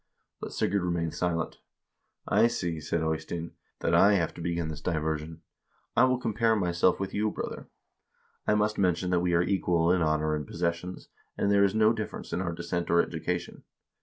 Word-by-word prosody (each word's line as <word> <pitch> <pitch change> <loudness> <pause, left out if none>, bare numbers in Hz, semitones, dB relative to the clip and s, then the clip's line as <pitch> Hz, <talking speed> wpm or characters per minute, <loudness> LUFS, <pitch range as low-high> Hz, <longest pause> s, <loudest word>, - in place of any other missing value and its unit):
But - - -6
Sigurd 100 +2 0
remained 85 -2 -1
silent. 85 -2 -2 0.7
'I - - +5
see,' 85 -8 -3
said 80 +2 -1
Eystein, 80 +1 -3 0.3
'that - - 0
I 100 +1 +6
have 85 -4 0
to - - -9
begin 85 -1 -2
this 75 -2 -6
diversion. 80 -1 -2 0.5
I 120 +2 +6
will 130 0 +2
compare 115 -1 +1
myself 90 -2 +2
with 95 -1 -3
you, 105 +1 +1
brother. - - -6 0.8
I 105 - +4
must 105 0 +1
mention 90 -1 +1
that 90 - +3
we 90 0 +1
are 85 - +4
equal 90 -3 +2
in 90 -1 +2
honor 75 -1 +1
and 75 -2 -3
posses 85 0 0
sions, 90 +2 -9 0.3
and 100 - +1
there 100 0 +5
is 100 +1 +2
no 110 +1 +5
difference 110 -2 -6
in 90 - 0
our 90 -2 -2
descent 85 +1 -3
or 85 - +4
education.' - - -2
85 Hz, 190 wpm, -28 LUFS, 85-100 Hz, 0.8 s, I